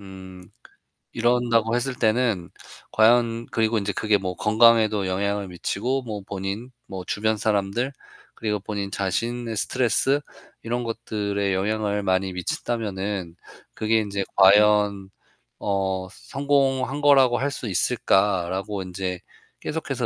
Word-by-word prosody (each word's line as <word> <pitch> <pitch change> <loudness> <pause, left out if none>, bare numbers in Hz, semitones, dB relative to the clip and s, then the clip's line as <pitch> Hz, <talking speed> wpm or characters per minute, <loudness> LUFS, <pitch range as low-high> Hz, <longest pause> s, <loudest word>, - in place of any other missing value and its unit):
음 95 -2 -11 0.7
이런다고 120 -1 +2
했을 125 +1 -1
때는 110 -6 0 0.4
과연 115 +1 +3
그리고 110 0 +1
이제 100 0 -2
그게 105 +1 +1
뭐 90 -1 -4
건강에도 110 -2 +4
영향을 100 +1 -1
미치고 120 +9 -2
뭐 105 -4 -6
본인 100 +5 -5 0.2
뭐 95 -1 -6
주변 110 +1 0
사람들 105 +5 0 0.4
그리고 105 -2 -2
본인 100 0 -4
자신의 115 +4 -2
스트레스 130 +6 +2 0.4
이런 120 +1 -2
것들에 100 -3 -2
영향을 105 +1 -1
많이 95 0 +1
미친다면은 95 -2 -3 0.4
'그게 110 +1 +1
인제 100 -2 -2
과연 100 0 +5 0.5
어 95 -2 -1
성공한 135 0 0
거라고 135 -4 +5
할 140 +1 -1
수 120 - -5
있을까?'라고 95 -1 +1
인제 90 0 -4 0.4
계속해서 - - -3
105 Hz, 270 characters per minute, -24 LUFS, 95-115 Hz, 0.7 s, 과연